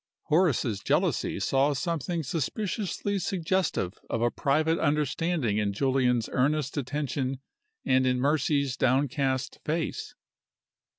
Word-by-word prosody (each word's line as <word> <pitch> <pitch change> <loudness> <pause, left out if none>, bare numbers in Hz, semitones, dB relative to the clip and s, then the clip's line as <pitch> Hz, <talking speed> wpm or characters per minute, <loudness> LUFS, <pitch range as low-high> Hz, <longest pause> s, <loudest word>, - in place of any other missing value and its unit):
Horace's 150 - +2
jealousy 100 - 0
saw 135 +8 +2
something 165 +2 -2
suspiciously 200 - -2
suggestive 175 - -1
of 115 - -1
a 120 - +2
private 155 +4 +1
understanding 150 -5 0
in 100 -1 0
Julian's 125 -1 +1
earnest 140 +1 +1
attention 135 -1 -2 0.5
and 130 0 +3
in 125 0 +1
Mercy's 140 -1 +1
downcast 130 0 0
face. 160 +1 -3
140 Hz, 105 wpm, -28 LUFS, 130-160 Hz, 0.5 s, and